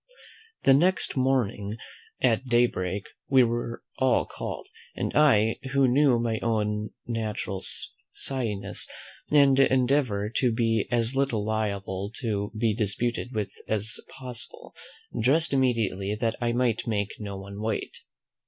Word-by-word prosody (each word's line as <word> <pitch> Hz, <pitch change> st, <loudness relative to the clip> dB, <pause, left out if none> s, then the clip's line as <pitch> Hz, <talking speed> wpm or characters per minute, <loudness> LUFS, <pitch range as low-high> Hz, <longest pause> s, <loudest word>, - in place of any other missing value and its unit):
The 135 Hz, -, +6 dB
next 180 Hz, +7 st, +2 dB
morning 120 Hz, -6 st, 0 dB, 0.4 s
at 120 Hz, +2 st, +2 dB
day 120 Hz, 0 st, +5 dB
break 95 Hz, -2 st, -3 dB, 0.2 s
we 130 Hz, -2 st, +6 dB
were 120 Hz, 0 st, -2 dB, 0.2 s
all 130 Hz, -1 st, +3 dB
called; -, -, -6 dB, 0.3 s
and -, -, -3 dB
I, 110 Hz, -8 st, +4 dB
who 140 Hz, -1 st, +4 dB
knew 130 Hz, 0 st, +4 dB
my 115 Hz, -1 st, -1 dB
own 105 Hz, -2 st, -1 dB, 0.2 s
natural 110 Hz, -4 st, -3 dB, 0.5 s
shyness, 105 Hz, -7 st, 0 dB, 0.4 s
and 140 Hz, -2 st, +5 dB
endeavour 130 Hz, -6 st, +2 dB
to 125 Hz, -2 st, +3 dB
be 115 Hz, -2 st, +1 dB
as 120 Hz, 0 st, +1 dB
little 135 Hz, -6 st, 0 dB
liable 100 Hz, -2 st, -2 dB
to 105 Hz, -4 st, -2 dB
be 110 Hz, -1 st, +2 dB
disputed 115 Hz, +3 st, -2 dB
with 105 Hz, -3 st, -2 dB, 0.2 s
as 110 Hz, +1 st, -2 dB
possible, 125 Hz, -3 st, -10 dB, 0.5 s
dressed 145 Hz, +7 st, +3 dB
immediately, 110 Hz, -7 st, +1 dB
that 115 Hz, +1 st, -1 dB
I 120 Hz, 0 st, +1 dB
might 120 Hz, -2 st, 0 dB
make 100 Hz, -3 st, -2 dB
no 100 Hz, -2 st, -5 dB
one 100 Hz, +1 st, -8 dB
wait. 110 Hz, -1 st, -3 dB
115 Hz, 130 wpm, -27 LUFS, 105-130 Hz, 0.5 s, The